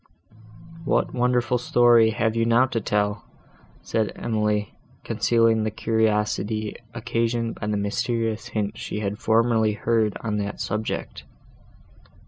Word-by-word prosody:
"What -, -, 0 dB
wonderful 125 Hz, 0 st, +1 dB
story 120 Hz, -2 st, +5 dB
have 110 Hz, 0 st, 0 dB
you 115 Hz, -, +2 dB
now 115 Hz, +2 st, +4 dB
to 120 Hz, -3 st, -3 dB
tell?" 105 Hz, +1 st, -1 dB, 0.6 s
said 110 Hz, -1 st, -1 dB
Emily, 105 Hz, -2 st, -1 dB, 0.3 s
concealing 115 Hz, -1 st, +2 dB
the 110 Hz, -, 0 dB
curiosity, 110 Hz, -1 st, 0 dB, 0.2 s
occasioned 115 Hz, 0 st, -1 dB
by 105 Hz, -, -4 dB
the 105 Hz, -1 st, 0 dB
mysterious 110 Hz, +2 st, -2 dB
hints 105 Hz, 0 st, -3 dB
she 105 Hz, -, -4 dB
had 105 Hz, 0 st, -3 dB
formerly 110 Hz, -1 st, +2 dB
heard 110 Hz, -1 st, 0 dB
on 105 Hz, -2 st, -2 dB
that 100 Hz, 0 st, -4 dB
subject. 110 Hz, +2 st, -4 dB
110 Hz, 120 wpm, -24 LUFS, 105-115 Hz, 0.6 s, story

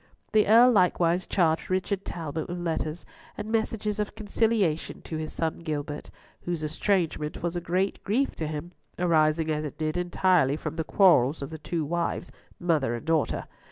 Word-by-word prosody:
The 215 Hz, -1 st, +4 dB
Earl 235 Hz, +4 st, +7 dB
likewise 180 Hz, -3 st, +2 dB
charged 165 Hz, -4 st, +1 dB
Richard 190 Hz, +1 st, -1 dB
Talbot 160 Hz, -2 st, -4 dB
with 175 Hz, -, -4 dB
letters 165 Hz, -1 st, -3 dB, 0.3 s
and 210 Hz, +1 st, -5 dB
messages 220 Hz, -2 st, -1 dB
of 210 Hz, 0 st, -2 dB
conciliation 215 Hz, -6 st, 0 dB
to 160 Hz, -, -5 dB
his 155 Hz, 0 st, -4 dB
son 160 Hz, -1 st, -2 dB
Gilbert, 150 Hz, -3 st, -4 dB, 0.3 s
whose 175 Hz, -3 st, -3 dB
estrangement 160 Hz, -1 st, -1 dB
was 170 Hz, 0 st, -1 dB
a 175 Hz, -, -2 dB
great 185 Hz, +3 st, -1 dB
grief 255 Hz, +7 st, +1 dB
to 160 Hz, -, -2 dB
him, 155 Hz, +3 st, -5 dB, 0.3 s
arising 160 Hz, -2 st, +2 dB
as 150 Hz, 0 st, -1 dB
it 150 Hz, -, -6 dB
did 155 Hz, +1 st, -1 dB
entirely 175 Hz, -5 st, +2 dB
from 160 Hz, -, -5 dB
the 160 Hz, -, 0 dB
quarrels 155 Hz, -6 st, +4 dB
of 140 Hz, -, -6 dB
the 160 Hz, -, -7 dB
two 160 Hz, 0 st, -2 dB
wives, 170 Hz, +2 st, -2 dB, 0.3 s
mother 155 Hz, -9 st, +1 dB
and 120 Hz, -, -7 dB
daughter. 160 Hz, -2 st, 0 dB
170 Hz, 170 wpm, -27 LUFS, 155-190 Hz, 0.3 s, Earl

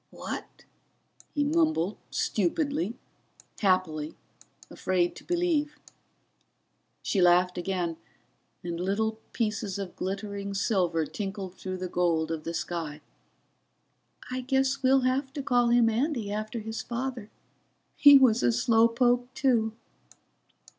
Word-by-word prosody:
"What -, -, -7 dB, 0.3 s
?" -, -, -29 dB
he 290 Hz, -, +2 dB
mumbled, 305 Hz, -, +1 dB
stupidly, 220 Hz, -, -1 dB, 0.6 s
happily, 185 Hz, -6 st, +1 dB, 0.5 s
afraid 180 Hz, -2 st, 0 dB
to -, -, -12 dB
believe. 335 Hz, -4 st, 0 dB, 1.3 s
She 195 Hz, -, +1 dB
laughed 180 Hz, +1 st, +4 dB
again, 175 Hz, -2 st, -2 dB, 0.7 s
and 170 Hz, -1 st, -4 dB
little 220 Hz, +4 st, -1 dB
pieces 215 Hz, -4 st, -2 dB
of 195 Hz, -3 st, -6 dB
glittering 200 Hz, +1 st, -4 dB
silver 180 Hz, -6 st, +1 dB
tinkled 195 Hz, 0 st, -5 dB
through 185 Hz, 0 st, -6 dB
the 185 Hz, 0 st, -4 dB
gold 170 Hz, -3 st, 0 dB
of 160 Hz, -1 st, -4 dB
the 165 Hz, -, -3 dB
sky. 160 Hz, -2 st, -4 dB, 1.3 s
"I 255 Hz, 0 st, -2 dB
guess 265 Hz, +1 st, +1 dB
we'll 265 Hz, +1 st, +4 dB
have 265 Hz, +2 st, 0 dB
to 285 Hz, -, -4 dB
call 245 Hz, -2 st, +3 dB
him 235 Hz, -1 st, +4 dB
Andy, 230 Hz, -2 st, -1 dB
after 215 Hz, +2 st, -3 dB
his 220 Hz, +1 st, -5 dB
father. 240 Hz, -2 st, -4 dB, 0.7 s
He 285 Hz, -1 st, +9 dB
was 255 Hz, -5 st, +4 dB
a 120 Hz, -, +3 dB
slow 225 Hz, -, +4 dB
poke 245 Hz, +1 st, +1 dB
too." 235 Hz, -5 st, +2 dB
215 Hz, 120 wpm, -28 LUFS, 180-255 Hz, 1.3 s, He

